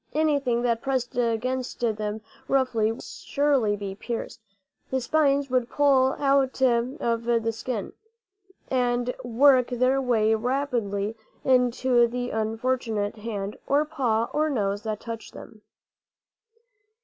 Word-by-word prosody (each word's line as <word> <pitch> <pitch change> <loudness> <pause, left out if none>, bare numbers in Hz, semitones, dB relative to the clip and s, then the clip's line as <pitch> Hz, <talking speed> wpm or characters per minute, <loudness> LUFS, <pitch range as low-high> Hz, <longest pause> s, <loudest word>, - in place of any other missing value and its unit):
Anything 280 -6 +1
that 235 -2 +1
pressed 260 -3 -2
against 245 +2 -1
them 215 -2 -1 0.3
roughly 245 -5 +2
would 225 - -8
surely 275 -8 0
be 200 -1 -5
pierced; 230 +2 -6 0.5
the 260 - 0
spines 280 0 +1
would 250 -1 +1
pull 270 -2 +3
out 275 -2 +1
of 235 -2 +1
the 230 -1 +1
skin, 225 -2 -5 0.8
and 245 -1 0
work 255 +1 +4
their 255 +2 +1
way 225 -4 +2
rapidly 225 -4 -1 0.3
into 250 -1 +3
the 245 +1 -4
unfortunate 225 -1 -1
hand 210 -2 -5
or 290 +2 +3
paw 235 -7 0
or 310 +1 +1
nose 205 -6 -1
that 215 -1 -4
touched 230 -1 -7
them. 215 - -12
245 Hz, 120 wpm, -25 LUFS, 225-260 Hz, 0.8 s, work